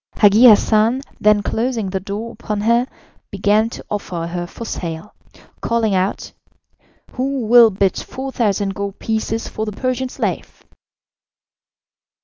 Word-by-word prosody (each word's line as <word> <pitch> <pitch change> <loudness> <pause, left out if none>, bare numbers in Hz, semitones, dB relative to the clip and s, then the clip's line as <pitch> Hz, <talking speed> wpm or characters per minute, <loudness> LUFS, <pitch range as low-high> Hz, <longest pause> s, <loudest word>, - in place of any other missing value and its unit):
Hagi 210 +3 +5
Hassan, 225 +3 +4 0.2
then 210 -1 +3
closing 225 -4 -2
the 190 - -1
door 210 +4 -6
upon 210 -3 -4
her, 235 +3 +2 0.4
began 205 +3 +1
to - - -10
offer 180 -5 -3
her 175 +1 -4
for 230 - -9
sale 170 0 -6 0.5
calling 230 -3 0
out: 190 +2 -1 0.8
"Who 270 +1 -2
will 235 0 +7
bid 195 -2 0
4,000 215 -7 -2
gold 200 0 -5
pieces 225 0 -2
for 215 - -5
the 215 - -3
Persian 255 +3 -2
slave?" - - -4
215 Hz, 125 wpm, -19 LUFS, 200-235 Hz, 0.8 s, will